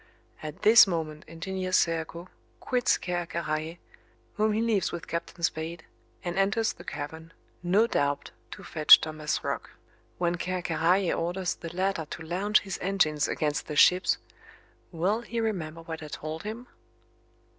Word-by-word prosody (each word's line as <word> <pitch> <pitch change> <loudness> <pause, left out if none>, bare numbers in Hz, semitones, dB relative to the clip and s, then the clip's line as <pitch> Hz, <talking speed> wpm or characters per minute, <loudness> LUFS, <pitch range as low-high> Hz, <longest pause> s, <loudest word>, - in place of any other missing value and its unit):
At 155 -1 -8
this 220 0 +9
moment 155 -4 -3
Engineer 185 +3 -4
Serko 165 0 0 0.3
quits 250 -2 +1
Ker 175 -1 -3
Karraje, 160 0 -3 0.6
whom 215 0 +1
he 215 - 0
leaves 225 -5 +1
with 170 - -6
Captain 170 +1 -5
Spade, 160 +1 -2 0.4
and 175 +1 -2
enters 215 +3 +2
the 175 - -13
cavern, 160 +1 -7 0.3
no 190 +5 +3
doubt 145 -9 -1 0.2
to - - -10
fetch 155 -2 +7
Thomas 155 -1 -3
Roch. - - -3 0.5
When 175 0 0
Ker 185 0 -2
Karraje 175 +3 +2
orders 175 +2 -1
the 165 - -8
latter 185 -3 0
to 165 - -7
launch 190 +6 +2
his 195 -2 -5
engines 170 -6 +1
against 150 -1 -1
the 150 - -4
ships 180 +5 +5 0.7
will 190 +7 0
he 235 0 -4
remember 165 -8 -3
what 160 -1 -6
I 155 - -7
told 155 +2 -6
him? 220 +5 -6
175 Hz, 150 wpm, -28 LUFS, 160-195 Hz, 0.7 s, this